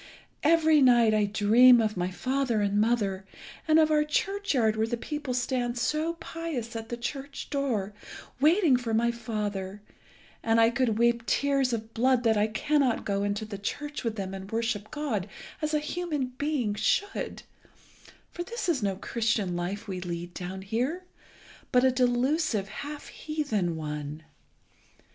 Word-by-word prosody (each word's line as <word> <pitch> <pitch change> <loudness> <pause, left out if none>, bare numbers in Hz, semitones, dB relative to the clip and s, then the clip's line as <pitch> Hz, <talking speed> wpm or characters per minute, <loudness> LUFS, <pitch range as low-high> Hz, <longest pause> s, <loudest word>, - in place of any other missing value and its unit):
Every 315 -1 +4
night 240 -4 +5
I 210 -1 +3
dream 225 +5 +6
of 215 -1 0
my 180 0 -1
father 250 +5 -1
and 205 0 +2
mother, 205 -4 0 0.4
and 310 0 +5
of 315 -1 +4
our 300 0 +4
churchyard 300 - 0
where 220 +1 0
the 240 - -2
people 285 0 -4
stand 245 -1 -1
so 305 +7 0
pious 320 -9 -5
at 225 0 -6
the 240 - -4
church 275 +3 -6
door 240 -9 -1 0.5
waiting 310 -1 +4
for 230 -3 -2
my 235 +1 +2
father, 210 -4 -4 0.6
and 225 0 +2
I 225 0 +5
could 235 -3 +1
weep 235 0 +2
tears 275 -2 +2
of 225 -1 -4
blood 250 +1 +2
that 225 -2 +3
I 210 0 +2
cannot 265 +3 +1
go 200 -1 0
into 205 +2 -1
the 205 -2 -7
church 290 +8 -4
with 230 -2 -2
them 195 -2 -4
and 195 +1 -8
worship 225 -2 -2
God 230 -11 -3 0.3
as 305 0 -1
a 305 - +2
human 300 -4 -3
being 285 -8 0
should, 220 - -1 0.9
for 345 - -6
this 470 +4 -4
is 320 -8 +1
no 200 -2 0
Christian 215 -3 -1
life 195 +5 -4
we 185 -2 -4
lead 175 0 -5
down 190 +1 -6
here, 250 - -2 0.7
but 250 -1 +4
a 260 - +5
delusive 250 - +1
half 290 +7 -7
heathen 245 - -2
one. 150 0 -5
235 Hz, 160 wpm, -28 LUFS, 205-285 Hz, 0.9 s, dream